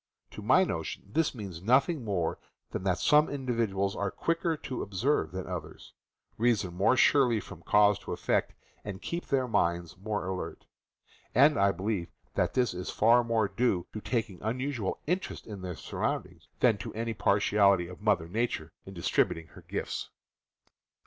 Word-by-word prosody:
To - - -8
my - - +5
notion - - -3
this 160 -4 +1
means 95 -7 -7
nothing 130 - +3
more 95 -7 -1 0.3
than - - -3
that 90 -2 +2
some 150 +9 +4
individuals 115 -8 -1
are 100 -1 -1
quicker 165 - -1
to 135 -4 -5
observe 110 +10 0
than 95 0 -5
others, - - -7 0.5
reason 110 -6 +2
more 100 +8 +3
surely 125 -4 +4
from 100 -5 -10
cause 105 +4 +4
to - - -8
effect, - - 0 0.3
and 100 -3 -6
keep 170 +9 -4
their 130 -2 +1
minds 85 -6 0
more 105 0 -2
alert; 95 0 -5 0.7
and 140 +5 +6
I 100 -4 +4
be 95 - -8
lieve 100 -5 -1 0.3
that - - 0
this 125 -5 +2
is 90 +1 -5
far 120 +3 +4
more 115 -2 +1
due 100 -7 0
to 110 - -5
their - - -10
taking 110 -7 -1
unusual 120 -1 -2
interest 185 +4 -2
in 105 -4 -8
their 90 -2 -5
surroundings - - -4
than 115 -5 +4
to 100 - -6
any 115 +1 -2
partiality 100 -2 +3
of 90 +3 -11
Mother 105 -6 +2
Nature 95 -5 -2 0.2
in 95 - -9
distributing 80 -1 0
her - - -14
gifts. - - -4
105 Hz, 170 wpm, -29 LUFS, 95-125 Hz, 0.7 s, and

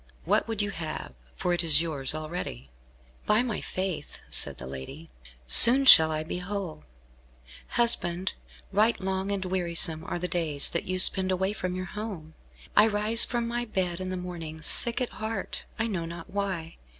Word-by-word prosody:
What - - +1
would 220 -2 -2
you 205 - -3
have, 155 - -6 0.2
for 180 - -1
it 175 - 0
is 155 -3 +4
yours 145 -4 +1
already?" 155 - -6 0.6
"By 215 +3 +3
my 235 -5 -3
faith," 185 -5 -4
said - - +4
the 60 - -9
lady, 70 - -9 0.3
"soon 245 - +6
shall 160 -11 +9
I 155 0 -2
be 180 +2 -5
whole. 180 - -6 0.9
Husband, 185 -6 +1 0.4
right 215 +3 +2
long 190 +1 -2
and 195 -2 -2
wearisome 170 -3 +2
are - - -3
the 180 +1 -3
days 160 -5 0
that 170 - -2
you 185 0 -2
spend 190 0 +4
away 190 +2 0
from 185 -3 -4
your 185 0 -4
home. 195 -7 -7 0.4
I 210 - +6
rise 215 +2 +3
from 240 -1 -2
my 240 +1 -2
bed 185 -6 -2
in 185 - -4
the 185 - -3
morning, 165 -3 -7
sick 235 +8 +2
at 250 - -1
heart, 220 -2 -5
I 220 - -1
know 185 -7 -3
not 170 +2 -9
why. 190 -5 -4
185 Hz, 175 wpm, -27 LUFS, 165-205 Hz, 0.9 s, shall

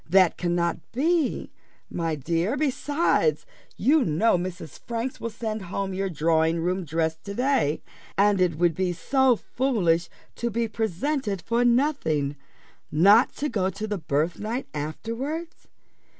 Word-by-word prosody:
That 185 -1 +5
cannot 175 -1 0
be, 315 +4 0 0.4
my 165 -2 -2
dear; 170 - -1
besides, 305 - +1 0.3
you 295 +1 +4
know 185 +4 +2
Mrs. 180 -2 -5
Franks 235 +2 -3
will 230 - -2
send 220 -1 -4
home 190 +1 -3
your 195 +1 -1
drawing 160 0 +2
room 180 +2 -1
dress 160 +1 -1
to 200 +3 -8
day, 245 - +1 0.3
and 200 -1 +4
it 170 -4 +2
would 170 0 +3
be 180 +2 -1
so 265 +8 +3
foolish 185 -10 0 0.3
to 235 - -1
be 230 +1 -1
presented 220 - -2
for 235 +1 +1
nothing 235 - +1 0.6
not 200 - +5
to 295 - -2
go 195 -8 0
to 205 +3 -5
the 210 -2 -3
birthnight 175 - -1
afterwards. 230 - -5
195 Hz, 135 wpm, -25 LUFS, 170-245 Hz, 0.6 s, That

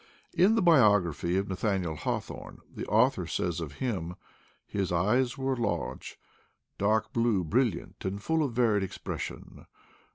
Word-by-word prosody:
In 195 +5 +4
the 225 - +2
biography 105 - +4
of 100 +1 0
Nathaniel 95 -3 -1
Haw - - -1
thorne, - - -10
the - - -6
author 110 -5 +3
says 85 0 -1
of 80 -4 -5
him: 90 - -3 0.5
"His 95 -3 -2
eyes 115 +9 +2
were 135 0 0
large, 115 -4 -3 0.6
dark 110 +2 +1
blue, 115 -5 +2
brilliant, 120 +7 -1
and 95 +1 -3
full 160 +9 0
of 140 -5 -1
varied 115 -4 +3
ex 95 - -4
pression. - - -7
105 Hz, 150 wpm, -29 LUFS, 90-125 Hz, 0.6 s, In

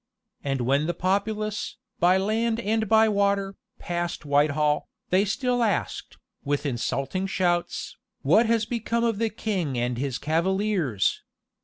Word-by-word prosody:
And 135 -2 -1
when 140 +5 +2
the 175 - -1
populace, 210 +3 -1 0.2
by 180 +2 +5
land 220 +4 0
and 220 -1 0
by 220 0 +6
water, 200 -1 +1 0.2
passed 175 -2 -3
Whitehall, 150 +1 +2 0.2
they 190 +3 +4
still 245 +4 0
asked, 215 -5 -1 0.3
with 145 +1 -1
insulting 140 +8 -2
shouts, 175 -2 -1 0.3
"What 230 +1 +4
has 230 -1 +2
become 235 0 -1
of 225 -3 +1
the 230 -1 +1
king 190 - -2
and 120 0 -1
his 135 -2 -2
cavaliers? 170 - 0
190 Hz, 135 wpm, -26 LUFS, 150-215 Hz, 0.3 s, by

